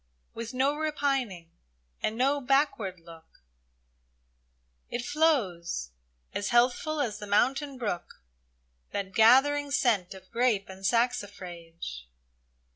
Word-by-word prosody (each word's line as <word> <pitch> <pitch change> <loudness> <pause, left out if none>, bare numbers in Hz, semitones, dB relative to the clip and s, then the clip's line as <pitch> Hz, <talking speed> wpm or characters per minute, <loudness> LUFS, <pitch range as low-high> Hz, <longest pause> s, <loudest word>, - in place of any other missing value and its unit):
With 230 0 -6
no 270 +3 +1
repining 275 - -1 0.5
and 220 - -1
no 275 +3 +2
backward 250 - +1
look 165 - -16 0.7
— - - -43 0.7
It 240 0 -3
flows, 200 - 0 0.4
as 200 - -2
healthful 250 +6 +2
as 220 -7 -1
the 210 - -7
mountain 265 +7 +1
brook, 180 - -4 0.7
That 195 -1 -3
gathering 270 +7 +5
scent 215 -10 +1
of 190 -1 -15
grape 230 -5 +1
and 190 0 -11
saxifrage. 185 - -2
230 Hz, 110 wpm, -28 LUFS, 190-270 Hz, 0.7 s, gathering